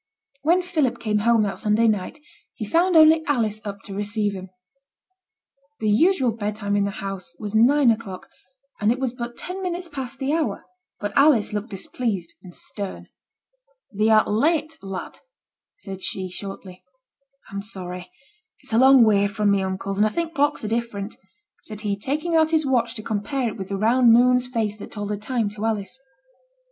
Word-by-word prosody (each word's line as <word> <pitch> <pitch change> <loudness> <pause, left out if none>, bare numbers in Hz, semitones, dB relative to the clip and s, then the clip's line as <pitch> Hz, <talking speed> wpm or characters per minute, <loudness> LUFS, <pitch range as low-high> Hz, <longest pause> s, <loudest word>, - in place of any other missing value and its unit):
When 345 +4 +3
Philip 315 -8 0
came 210 -2 0
home 230 +1 +3
that 200 - -3
Sunday 215 +2 +2
night, 210 +5 -1 0.4
he 215 - -5
found 345 - +2
only 315 0 +7
Alice 220 -7 0
up 200 -1 -6
to 200 - -8
receive 205 +1 -1
him. 190 -1 -8 1.3
The 215 -1 +1
usual 265 - +3
bedtime 210 -2 -3
in 200 -1 +2
the - - -1 0.2
household 190 -3 -6
was 210 -1 -5
nine 250 +3 +5
o'clock, 215 -5 -5 0.5
and 210 +1 +3
it 245 - 0
was 260 -2 -2
but 240 -1 -6
ten 370 +2 -5
minutes 355 -1 -3
past 270 -4 -6
the 270 +2 -1
hour; 325 0 -1 0.3
but 205 0 -4
Alice 280 -8 +4
looked 210 +3 -3
displeased 195 -2 -3
and 180 -2 -12
stern. 200 -2 -7 0.8
'Thee 215 +1 +1
art 215 -1 +5
late, 310 +8 +1
lad,' 195 -1 -7 0.6
said 195 - -8
she, 185 -1 -3
shortly. 190 -1 -8 0.7
'I'm 200 0 -4
sorry; 180 -3 -7 0.5
it's - - -10
a 225 - +4
long 265 -1 +7
way 205 -2 +4
from 205 0 +1
my 200 -1 +2
uncle's, 190 +1 -3
and 215 - +5
I - - 0
think 335 +6 -3
clocks 290 -3 +1
are - - -2
different,' 220 -2 -3 0.4
said 215 -1 -8
he, 205 -2 -1
taking 305 +10 -2
out 315 -1 +4
his 315 -2 +2
watch 240 -3 +1
to 215 - -6
compare 225 +4 -2
it - - -7
with 190 -3 -7
the 200 - -2
round 235 +3 +4
moon's 250 +1 +5
face 220 -4 -2
that 205 - -9
told 205 -1 -4
the 210 - -2
time 225 +1 -1
to 210 +1 -8
Alice. 220 +2 -2
220 Hz, 180 wpm, -23 LUFS, 205-265 Hz, 1.3 s, only